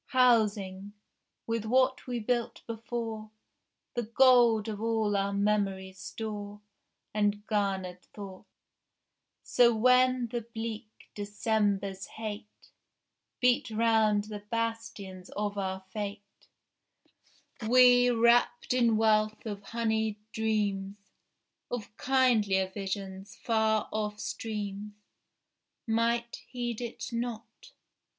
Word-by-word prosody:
Housing, 205 -5 +2 0.5
with 230 -1 -1
what 255 +3 +2
we 245 -1 -2
built 235 +1 -2
before, 225 -1 -5 0.6
The 240 - -1
gold 235 -2 +5
of 210 -1 -4
all 220 -2 +1
our 200 0 +1
memory's 200 -2 0
store 210 -1 -6 0.5
And 205 0 0
garnered 190 -4 -1
thought; 195 -3 -10 1.0
So 240 -2 +4
when 255 +2 +4
the 240 +1 -2
bleak 225 0 -6 0.3
December's 205 -2 -1
hate 215 -1 -8 0.7
Beat 250 -1 +3
round 220 -2 +3
the 210 0 -7
bastions 210 -4 -4
of 205 -1 -1
our 190 -1 -3
fate, 205 -1 -7 1.2
We, 245 0 +7
wrapt 240 +1 +3
in 235 -3 +3
wealth 215 0 +2
of 205 -2 -5
honeyed 220 -1 0 0.2
dreams 205 -3 -1 0.7
Of 220 -3 -5
kindlier 215 -8 +2
visions, 195 0 -5
far 220 -2 +1
off 210 -1 -2
streams, 210 -2 -5 0.9
Might 235 +1 0
heed 240 -2 -4
it 240 +1 -6
not. 235 -1 -5
220 Hz, 100 wpm, -29 LUFS, 205-235 Hz, 1.2 s, We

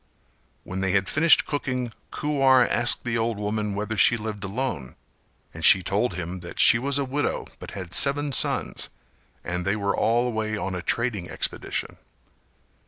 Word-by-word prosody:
When 95 +2 -5
they 95 -1 0
had 100 -1 +1
finished 160 - +4
cooking 125 -5 -3 0.2
Kuwar 135 -4 +2
asked 120 +1 +2
the 120 -1 -1
old 115 -1 -1
woman 105 0 -3
whether 105 +2 -3
she 120 +2 +4
lived 105 -1 -6
alone 100 - -4 0.6
and 80 - -9
she 95 +2 +7
told 100 +2 0
him 90 +1 -5
that 85 0 -10
she 115 - +6
was 140 +2 0
a 140 - 0
widow 145 +3 -2
but - - -9
had 90 -2 -7
seven 145 +1 +3
sons - - 0 0.5
and 90 0 -3
they 100 +3 0
were 100 -1 -1
all 120 +2 +1
away 110 -2 -2
on 95 -2 -4
a 90 - -4
trading 110 -5 -2
expedition. - - -3
110 Hz, 170 wpm, -24 LUFS, 95-125 Hz, 0.6 s, she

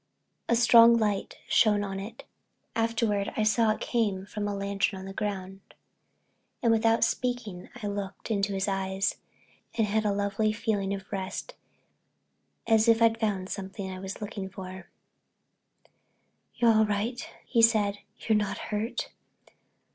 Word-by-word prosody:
A 235 - +4
strong 235 0 +7
yellow 215 -2 +3
light 195 - -6
shone 210 -2 +4
on 195 -1 -4
it—afterward 225 0 -3
I 215 - +2
saw 220 +1 +3
it 215 - 0
came 205 -5 0
from 205 0 -4
a 205 - -2
lantern 200 0 -1
on 190 - -8
the 195 - -7
ground—and 195 +3 -6
without 225 0 +3
speaking 245 -8 -2
I - - -2
looked 200 +1 -5
into 200 -1 0
his 190 +1 -1
eyes, 195 0 -1 0.6
and 225 - +3
had 215 +1 0
a 210 - +1
lovely 200 +2 0
feeling 205 -3 -1
of 195 0 -11
rest 195 - -4 1.1
as 225 0 +4
if 230 -1 +5
I'd 230 -1 +4
found 195 -4 -1
something 190 0 -5
I 185 - -7
was 190 +2 -7
looking 200 -2 -5
for. 185 -1 -9 1.7
"You're 235 -1 +4
all 220 0 +4
right?" 210 +5 -2 0.2
he 235 - +2
said; 210 -3 +3 0.2
"you're 220 - +1
not 210 -1 0
hurt?" 215 +3 -3
205 Hz, 145 wpm, -28 LUFS, 195-225 Hz, 1.7 s, strong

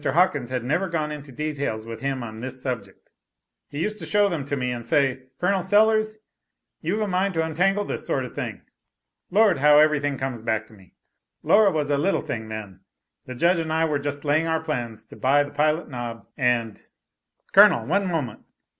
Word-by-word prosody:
Hawkins 150 -4 +2
had 125 -2 -2
never 175 +9 0
gone 155 -3 -2
into 145 -2 -8
details 140 -6 -3
with 115 0 -8
him 135 -2 -2
on 110 -1 -8
this 130 +2 -6
subject.] 120 -7 -6 0.6
He 145 +3 -4
used 215 0 -3
to - - -5
show 205 -1 +3
them 160 -7 -3
to 140 0 -2
me, 125 -1 -1
and 120 -1 -5
say, 130 0 0
'Col, 190 +1 +1
Sellers 215 +3 +3 0.6
you've 185 +7 -1
a 210 - 0
mind 190 0 0
to 160 0 +1
untangle 195 +6 +1
this - - -5
sort - - 0
of - - -10
thing.' - - -5 0.7
Lord, 205 -5 +4
how 150 +1 +6
everything 145 -2 +3
comes 130 -3 -4
back 110 -1 -1
to - - -17
me. 95 -4 -19 0.5
Laura 210 -1 +5
was 150 -5 -1
a 140 - +2
little 190 +7 +1
thing 110 -1 -5
then. 105 -4 -7 0.5
'The 130 - -6
Judge 170 +7 +3
and 160 -1 -3
I 160 +1 +2
were 150 -3 0
just 145 +1 -5
laying 155 +3 +2
our 160 -1 0
plans 120 -8 -4
to - - -14
buy 140 +3 +3
the 145 - -9
Pilot 155 +2 +1
Knob, 120 -4 -6
and 120 -5 0 0.3
" - - -43
"Colonel, 115 - +7
one 195 - +1
moment. 150 - -2
145 Hz, 200 wpm, -24 LUFS, 125-170 Hz, 0.7 s, Colonel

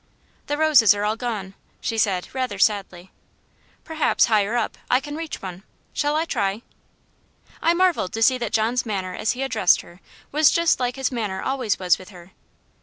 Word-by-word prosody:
"The 290 - -1
roses 285 -10 +5
are 205 - -3
all 210 +1 0
gone," 215 -5 -4 0.3
she 225 - -3
said 190 -4 0
rather 255 -6 -2
sadly. 190 -3 0 0.7
"Perhaps, 320 -2 +2
higher 215 0 +1
up, 230 - -2
I 250 - +4
can 290 +2 -7
reach 320 -7 -6
one 185 -1 -7 0.3
shall 295 0 0
I 320 +1 +1
try?" 210 -6 -2 1.0
I 335 +1 +3
marvelled 355 - +1
to 225 - 0
see 255 +2 +4
that 235 -3 -3
John's 230 +3 +1
manner 190 -5 -3
as 215 - -1
he 260 +2 -4
addressed 255 -9 +3
her 175 +2 -17 0.3
was 305 +1 +5
just 335 -1 +2
like 250 -1 -1
his 270 -1 -1
manner 210 -6 -3
always 255 -6 -1
with 185 0 0
her. 180 -2 -14
225 Hz, 180 wpm, -23 LUFS, 195-270 Hz, 1.0 s, roses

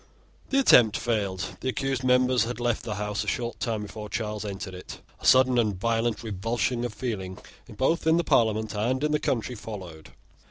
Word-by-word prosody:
The 275 - +1
attempt 120 - +6
failed. 95 -5 -2
The 130 - -2
accused 135 0 -2
members 125 -1 +3
had 120 +1 -5
left 120 -2 0
the 105 - -4
House 105 +1 -2
a - - -10
short 120 -1 -2
time 110 -3 -2
before 105 +1 -8
Charles 105 -1 -3
entered 100 -1 -6
it. 90 - -9 0.2
A - - -3
sudden 130 -1 +5
and 105 -5 0
violent 115 +1 0
revulsion 115 +4 -1
of 120 - -2
feeling, 105 -5 -4 0.3
both 160 +5 0
in 160 +1 +5
the 170 - +2
Parliament 110 -5 +2
and 120 +6 -1
in 150 - +1
the 150 - +2
country, 125 -2 -1
followed. 95 -8 -9
115 Hz, 190 wpm, -26 LUFS, 105-125 Hz, 0.3 s, attempt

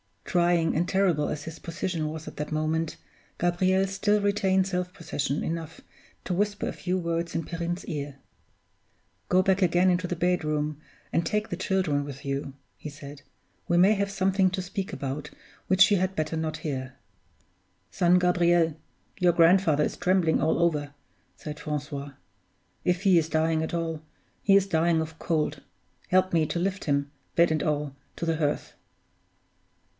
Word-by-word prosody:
Trying 175 -2 +2
and 175 +2 +1
terrible 180 -7 +2
as 150 - -4
his 160 0 -8
position 165 -1 -3
was 155 0 -6
at - - -9
that 150 +1 -4
moment, 155 +1 -1 0.4
Gabriel 185 +2 +2
still 205 +2 +1
retained 195 -2 +2
self 180 -1 -2
possession 145 -3 -2
enough 165 -1 -5 0.4
to 185 - -2
whisper 205 +2 0
a - - -5
few 180 0 -2
words 170 -1 -2
in 165 - 0
Perrine's 170 +2 -4
ear. 145 -2 -4 1.1
"Go 185 +1 +4
back 190 +1 +2
again 180 +1 +4
into 180 0 +1
the 175 - -2
bedroom, 155 -4 0 0.3
and 170 - +1
take 210 0 -1
the 175 - -3
children 180 -7 0
with 140 0 -8
you," 140 0 -3 0.2
he 150 - -7
said. 145 0 -11 0.4
"We 175 - +2
may 190 +4 +6
have 200 -1 -1
something 190 0 +2
to 185 0 -2
speak 190 +1 -5
about 145 +2 -4 0.4
which 190 +2 +5
you 205 - +5
had 185 +1 -1
better 155 0 -1
not 160 -1 -3
hear." 130 -4 -4 1.0
"Son 180 -1 +4
Gabriel, 175 -3 +3 0.4
your 180 -2 +4
grandfather 165 -3 +4
is - - -2
trembling 180 -3 +2
all 160 - +2
over," 150 -4 +1 0.4
said 150 -1 -8
Francois. 145 -2 -4 0.7
"If 180 +1 +1
he 190 -4 +6
is 160 0 -2
dying 160 0 +1
at 160 - -3
all, 165 -2 -2 0.4
he 195 - +4
is 200 -1 +5
dying 165 -2 +2
of 160 0 -7
cold; 150 -4 -1 0.5
help 185 0 +3
me 160 -2 +3
to - - -2
lift 190 +2 -2
him, 140 -1 0 0.2
bed 170 -1 +4
and 155 -1 +1
all, 150 -2 -1 0.2
to 170 - -4
the 165 -1 0
hearth." 150 -2 -1
170 Hz, 165 wpm, -27 LUFS, 155-185 Hz, 1.1 s, may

